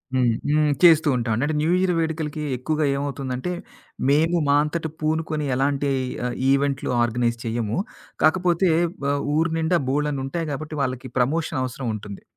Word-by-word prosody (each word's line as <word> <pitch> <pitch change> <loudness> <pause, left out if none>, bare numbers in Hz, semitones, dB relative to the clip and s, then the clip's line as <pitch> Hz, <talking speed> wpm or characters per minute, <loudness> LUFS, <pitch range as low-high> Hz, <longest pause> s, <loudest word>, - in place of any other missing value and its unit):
హ్మ్. 125 -1 +3 0.2
హ్మ్. 150 0 +3 0.2
చేస్తూ 160 -2 +7
ఉంటామండి. 115 0 0
అంట 155 - -1
న్యూ 160 +3 +1
ఇయర్ 185 -1 +2
వేడుకలకి 160 -2 -2
ఎక్కువగా 155 +4 -1
ఏమవుతుందంటే, 140 +1 -3 0.6
మేము 160 +4 +3
మా 140 - +4
అంతట 160 +1 -3
పూనుకొని 155 -1 -1
ఎలాంటి 140 +1 0 0.4
ఆహ్, 125 - -2 0.2
ఈవెంట్లు 140 -1 +1
ఆర్గనైజ్ 120 0 +1
చెయ్యము. 115 -2 -2 0.5
కాకపోతే 175 +2 +3 0.4
వ - - +1 0.3
ఊరు 160 +1 +2
నిండా 165 +2 +2
బోల్డన్నుంటాయి 150 +2 -1
కాబట్టి 155 +2 -5
వాళ్ళకి 130 -1 -3
ప్రమోషన్ 145 +3 0
అవసరం 130 0 -4
ఉంటుంది. 100 -1 -9
145 Hz, 140 wpm, -23 LUFS, 130-160 Hz, 0.6 s, చేస్తూ